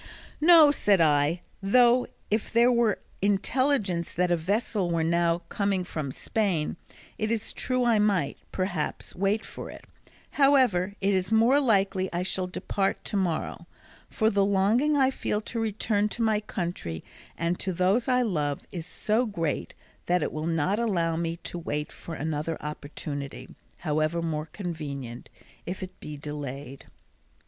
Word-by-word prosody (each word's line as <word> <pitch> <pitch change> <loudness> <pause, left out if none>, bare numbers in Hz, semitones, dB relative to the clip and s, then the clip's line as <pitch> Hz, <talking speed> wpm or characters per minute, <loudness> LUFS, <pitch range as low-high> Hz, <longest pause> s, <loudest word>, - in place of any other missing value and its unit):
"No," 320 -2 +8
said 205 -9 +3
I; 155 +2 +3 0.2
"though 245 +5 +4 0.2
if 215 +1 0
there 235 +2 +5
were 235 -4 +2 0.2
intelligence 205 - +1
that 180 0 +1
a - - +5
vessel 195 +2 -1
were 165 -1 +1
now 170 +1 +1
coming 200 -2 0
from 155 -6 -4
Spain 190 - -1 0.4
it 215 - 0
is 230 -2 -2
true 255 -1 0
I 230 -3 +4
might, 195 -9 +1
perhaps, 185 -5 -3
wait 200 +3 0
for - - -8
it; - - -11 0.5
however, 250 -10 +3
it 200 +1 +2
is 185 0 0
more 230 +5 +5
likely 195 -7 +2
I 175 +1 -1
shall 185 0 -2
depart 195 +2 -2
to 215 - -4
morrow, 170 -2 -1 0.4
for 220 0 +1
the 200 0 +3
longing 210 +10 +3
I 265 -1 +4
feel 210 - -1
to 230 +1 -5
return 215 -1 0
to 230 - -2
my 220 -2 +3
country 175 - -4 0.3
and 170 +2 -1
to 190 - -1
those 185 +7 +2
I 250 -1 +3
love 150 - -1
is 170 -2 -5
so 220 +6 0
great 165 -8 -3 0.3
that 180 -2 +2
it - - -2
will 155 +1 -3
not 170 +5 +1
allow 175 -8 +1
me 165 0 -2
to 175 - -5
wait 150 -2 -3
for 165 - -8
another 155 +1 -2
opportunity, 145 -1 -6 0.2
however 155 +1 0
more 155 -1 -2
convenient, 145 - -6 0.4
if 185 +1 -4
it 185 - -9
be 150 -1 -7
delayed." 140 -2 -7
185 Hz, 155 wpm, -27 LUFS, 165-220 Hz, 0.5 s, No